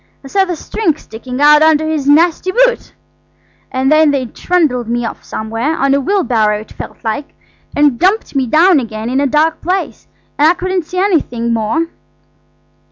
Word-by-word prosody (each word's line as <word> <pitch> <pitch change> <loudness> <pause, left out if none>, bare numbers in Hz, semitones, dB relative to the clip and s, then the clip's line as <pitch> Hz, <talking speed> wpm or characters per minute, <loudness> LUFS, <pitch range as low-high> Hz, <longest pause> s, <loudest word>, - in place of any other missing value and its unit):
I 270 - -10
saw 390 +6 +2
the 360 -2 -3
string 325 -1 -2
sticking 250 +2 -8
out 300 +1 +6
under 315 0 +3
his 300 -3 -1
nasty 335 +4 +3
boot. - - +1 0.8
And 260 +2 0
then 310 0 +5
they 275 -3 0
trundled 260 -3 -1
me 240 0 -2
off - - -7
somewhere, 225 +8 -3
on 275 0 +1
a 280 - +1
wheelbarrow 240 - +1
it 215 - -15
felt - - -9
like, 260 +6 -4 0.4
and 290 -5 +2
dumped 380 -1 +1
me 265 -2 0
down 325 +5 +4
again 225 -1 -5
in 265 +2 +1
a 285 - +1
dark 310 +3 +1
place–and 355 -4 -2
I 340 - +4
couldn't 370 -1 -2
see 365 - -7
anything 280 - 0
more." 230 +9 0
295 Hz, 170 wpm, -14 LUFS, 245-345 Hz, 0.8 s, out